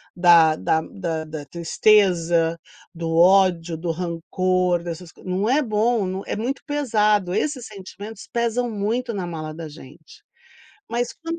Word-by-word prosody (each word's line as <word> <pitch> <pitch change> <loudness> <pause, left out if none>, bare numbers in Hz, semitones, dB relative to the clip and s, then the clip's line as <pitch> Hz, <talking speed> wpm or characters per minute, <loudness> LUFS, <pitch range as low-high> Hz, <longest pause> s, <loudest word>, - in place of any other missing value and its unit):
da 170 -3 +6
da 160 0 +1
da 165 -5 -4
da 155 -2 -7
tristeza, 170 -2 +2 0.3
do 165 -1 -3
ódio, 175 -2 +4
do 165 0 -2
rancor, 180 +1 0
dessas 170 0 -7
não 190 +3 -1
é 280 +5 +3
bom, 215 -4 0
é - - -3
muito 250 +6 -3
pesado, 215 - +1
esses 275 -5 -1
sentimentos 205 +1 -10
pesam 235 +1 0
muito 225 +3 -2
na 185 -3 -3
mala 155 -2 -6
da 165 0 -7
gente. 165 - -15 0.7
Mas 240 +1 -2
quando 330 0 -6
185 Hz, 135 wpm, -22 LUFS, 165-225 Hz, 0.7 s, da